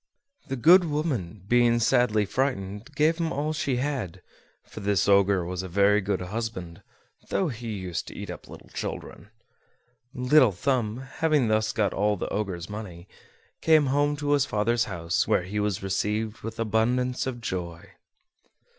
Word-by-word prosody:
The 135 - -2
good 170 +8 +6
woman, 135 - -2
being 120 0 +4
sadly 110 -2 +3
frightened, 105 -2 -2
gave 155 +3 +3
him 165 -1 -1
all 155 -1 -1
she 140 -4 -1
had: 120 - -3 0.4
for - - -11
this 100 -1 +1
Ogre 100 -2 +4
was 90 +1 -3
a 95 - -6
very 100 +3 +3
good 95 -1 -1
husband, 95 -3 -5 0.5
though 190 -4 +1
he 115 -3 -5
used 95 -4 -4
to - - -9
eat - - -6
up - - -10
little - - -12
children. 105 - -6 0.8
Little 125 -2 +4
Thumb, 120 +2 -1
having 140 -2 +1
thus 110 0 +2
got 105 -3 0
all 105 +1 +1
the - - -4
Ogre's 95 -5 -3
money, 100 -4 -8 0.5
came 155 -2 +5
home 145 +1 +2
to 145 0 -2
his 145 -1 +3
father's 115 +3 +1
house, 85 0 -1
where - - +2
he 100 +4 -3
was 105 -3 -1
received 105 +3 -1
with 115 +1 -7
abundance 125 +4 0
of 125 -2 -4
joy. 85 -6 -5
110 Hz, 160 wpm, -26 LUFS, 100-130 Hz, 0.8 s, good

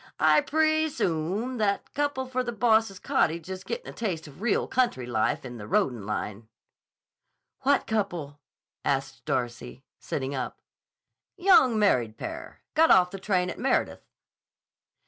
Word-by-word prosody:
I - - +5
pree 315 +1 +2
soom 195 - -1
that 200 -2 0
couple 285 -2 -1
for 255 0 -2
the 240 - -3
boss's 220 -3 +2
cottage 170 0 0
is 185 0 -6
gettin' 475 - -5
a - - -7
taste 185 -8 -3
of 145 +5 -14
real 235 -2 +1
country 240 - 0
life 120 +1 0
in 120 -1 -7
the 105 -2 -8
roadin' 110 -2 0
line." 105 +1 -4 1.1
"What 280 +1 +2
couple?" 175 -10 -2 0.4
asked - - -2
Darcy, 120 - -3 0.2
sitting 135 +1 -3
up. 130 -2 -4 0.8
"Young 350 - +5
married 125 - +2
pair. - - -7
Got 325 +1 +5
off 180 -1 +6
the 195 - -7
train 185 -2 0
at - - -9
Meredith." 265 - 0
195 Hz, 145 wpm, -27 LUFS, -, 1.1 s, off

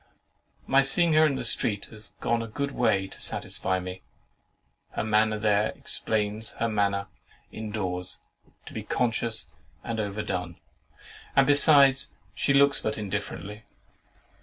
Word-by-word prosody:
My 135 +1 +4
seeing 160 +5 +5
her 155 0 +5
in 140 - -1
the - - -4
street 100 -2 +1
has 105 -1 -10
gone 120 0 0
a 115 - -5
good 140 +6 -4
way 110 -7 +1
to - - -8
satisfy 95 0 0
me. 90 0 -7 0.9
Her - - -2
manner 110 0 +2
there 105 0 +2
explains 110 0 -2
her 115 - -2
manner 100 -2 0 0.5
in 110 0 -7
doors 90 -4 -3 0.5
to - - -11
be - - -5
conscious 115 -6 -2 0.3
and 115 -1 -4
overdone; 100 -4 -4 0.8
and 135 - +5
besides, 140 -1 +5 0.2
she - - 0
looks 140 0 +4
but 110 - -3
indifferently. 105 0 -5
110 Hz, 135 wpm, -26 LUFS, 100-130 Hz, 0.9 s, seeing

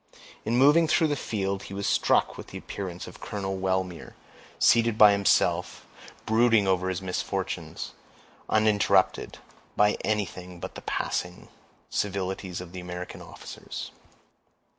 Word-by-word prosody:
In 115 +2 +1
moving 150 +5 +6
through 155 0 +3
the 145 - +1
field, 100 -6 -2
he 95 - -8
was 100 0 -3
struck - - +2
with - - -9
the - - -8
appearance 90 -3 -6
of - - -12
Colonel 95 -2 -3
Wellmere, 95 -2 -2 0.4
seated 115 -2 +4
by 105 -1 +9
himself, 100 -1 +1 0.4
brooding 115 -2 +4
over 95 -1 +1
his 95 0 -3
misfortunes, 90 -1 -3 0.6
uninterrupted 110 -2 +2 0.4
by 105 0 +4
anything 90 -4 -3
but - - -6
the - - -9
passing 90 0 -3 0.4
civilities 95 -2 -2
of 90 -2 -9
the 95 - -7
American 90 0 -7
officers. - - -8
100 Hz, 130 wpm, -27 LUFS, 90-110 Hz, 0.6 s, by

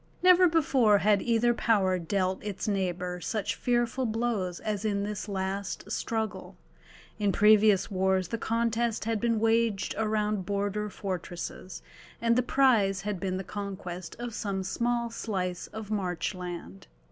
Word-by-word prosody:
Never 365 0 +7
before 270 -10 +4
had 205 0 +3
either 240 0 +2
power 195 -6 +2
dealt 185 +2 -1
its 205 -1 -4
neighbour 180 -3 -2
such 215 +3 -2
fearful 245 +1 0
blows 215 -6 -1
as 210 -2 -3
in 200 -2 0
this 210 0 -4
last 195 +1 -3
struggle: 220 -1 -3 0.6
in 205 -1 +2
previous 210 -1 +5
wars 190 -1 +1
the 230 - -3
contest 230 0 0
had 225 -2 -1
been 230 -2 +1
waged 225 -2 +1
around 215 -2 0
border 205 +1 -2
fortresses, 185 -1 -6 0.4
and 230 0 +2
the 250 - +4
prize 230 -7 +3
had 205 -1 -3
been 185 0 -2
the 190 - -4
conquest 185 -3 -6
of 240 0 -5
some 195 -3 -2
small 235 +4 -1
slice 185 -6 -3
of 220 -1 -8
marchland. 180 - -4
210 Hz, 140 wpm, -28 LUFS, 190-230 Hz, 0.6 s, Never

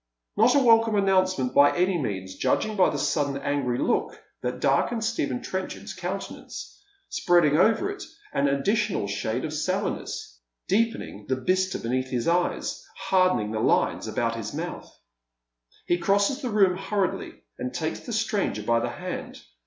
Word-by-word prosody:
Not 230 +5 +5
a - - +6
welcome 225 -2 +5
announcement, 185 -9 +2
by 145 +3 +5
any 180 +1 +2
means, 95 -6 -4
judging 215 -1 0
by 190 -3 +4
the - - -3
sudden 140 -3 0
angry 140 -3 -1
look - - 0 0.2
that 125 0 -3
darkens 220 - +1
Stephen 140 - -2
Trenchard's 190 0 -5
countenance, - - -6 0.3
spreading 175 -5 +3
over 225 - +3
it 400 -1 -8 0.3
an 140 +1 +2
additional 195 - +1
shade 110 +5 -2
of 155 - -4
sallowness, 185 - -3 0.3
deepening 205 - -1
the 130 - +2
bistre 185 +8 0
beneath 130 +2 -2
his 125 -2 -2
eyes, 175 +1 0
hardening 185 - +2
the 110 - -2
lines - - +1
about - - -1
his - - -5
mouth. - - -5 0.9
He 175 - +1
crosses 200 +10 +2
the 255 - -2
room 195 -4 +3
hurriedly, 195 -1 -2 0.2
and 125 0 -3
takes 155 +5 -3
the 245 - -8
stranger 210 - -1
by 115 +2 +2
the - - -2
hand. - - -6
180 Hz, 155 wpm, -26 LUFS, 130-205 Hz, 0.9 s, a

